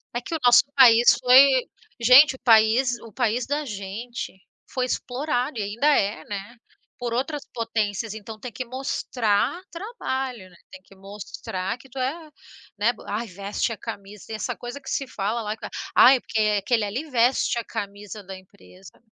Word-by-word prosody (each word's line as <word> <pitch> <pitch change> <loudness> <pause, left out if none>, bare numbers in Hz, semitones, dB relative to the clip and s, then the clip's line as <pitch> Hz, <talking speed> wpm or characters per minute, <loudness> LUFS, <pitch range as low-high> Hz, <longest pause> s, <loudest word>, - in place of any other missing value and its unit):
É 240 - -1
que 330 - -7
o 320 - -2
nosso 245 0 +7
país 240 -3 +7
foi 260 +1 +6 0.4
gente, 260 +4 +7
o - - -15
país 235 +2 +4
o 230 - -12
país 240 0 0
da 290 +1 -2
gente 210 0 -7 0.3
foi 255 -1 -1
explorado. 255 0 -2
E - - -1
ainda 220 +8 -1
é, 210 -9 +2
né, 205 +3 -7 0.4
por 240 -1 -4
outras 275 +4 -2
potências. 225 -2 -2
Então 220 0 -9
tem 250 +2 -7
que 240 +5 -6
mostrar 255 - -1
trabalho, 265 - -5
né. 180 - -20 0.2
Tem 190 - -12
que 195 - -19
mostrar 195 0 -6
que 265 +2 -18
tu 265 - -13
é, 305 +5 -3 0.5
né, 220 +4 +2 0.2
“Ai, 220 +3 -3
veste 200 +4 -3
a - - -9
camisa.” 200 0 -9
Tem 220 - -5
essa 215 - -3
coisa 245 +3 -8
que 270 - -9
se 275 - -2
fala 220 +1 -2
lá, 210 0 -3
que - - -9
é: - - -6 0.3
“Ai, 260 +1 +7
porque 220 - -3 0.2
aquele 235 -2 +1
ali 255 +10 -5
veste 245 0 +2
a - - -4
camisa 205 +1 -7
da 190 0 -9
empresa.” 190 +1 -18
235 Hz, 180 wpm, -24 LUFS, 205-260 Hz, 0.5 s, nosso